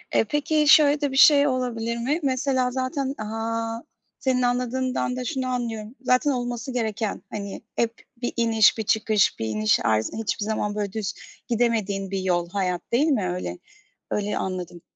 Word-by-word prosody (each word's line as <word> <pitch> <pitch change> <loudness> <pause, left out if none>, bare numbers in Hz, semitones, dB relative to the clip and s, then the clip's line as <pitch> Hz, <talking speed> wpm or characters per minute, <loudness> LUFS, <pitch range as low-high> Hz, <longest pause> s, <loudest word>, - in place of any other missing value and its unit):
E, - - +5
peki, 295 +5 +1
şöyle 295 -1 +6
de 285 -2 0
bir 270 - -3
şey 285 0 +7
olabilir 235 -3 -1
mi? 270 +7 0
Mesela 260 -1 +1
zaten, 265 +1 -2
aaa, 225 +1 -3 0.4
senin 260 -1 +1
anladığından 250 +1 0
da 255 0 -4
şunu 260 -2 -2
anlıyorum. 235 -2 -3
Zaten 260 +3 +2
olması 245 +1 -3
gereken, 220 -3 -2
hani, 200 -2 -6
hep 230 -1 0 0.3
bir 245 - -2
iniş, 225 -2 +4
bir 220 - -1
çıkış, 215 -1 +2
bir 110 - -2
iniş, 110 -1 +2
arz 110 0 +1
hiçbir 215 -1 -2
zaman, 210 -1 -2
böyle, 205 -2 -3
düz 215 -2 -3 0.3
gidemediğin 215 -5 0
bir 195 - -1
yol 175 -2 0
hayat, 180 -2 -1
değil 275 +7 +3
mi 220 - +1
öyle? 180 - -4 0.5
Öyle 210 0 -1
anladım. 180 -2 -4
230 Hz, 165 wpm, -24 LUFS, 205-255 Hz, 0.5 s, şey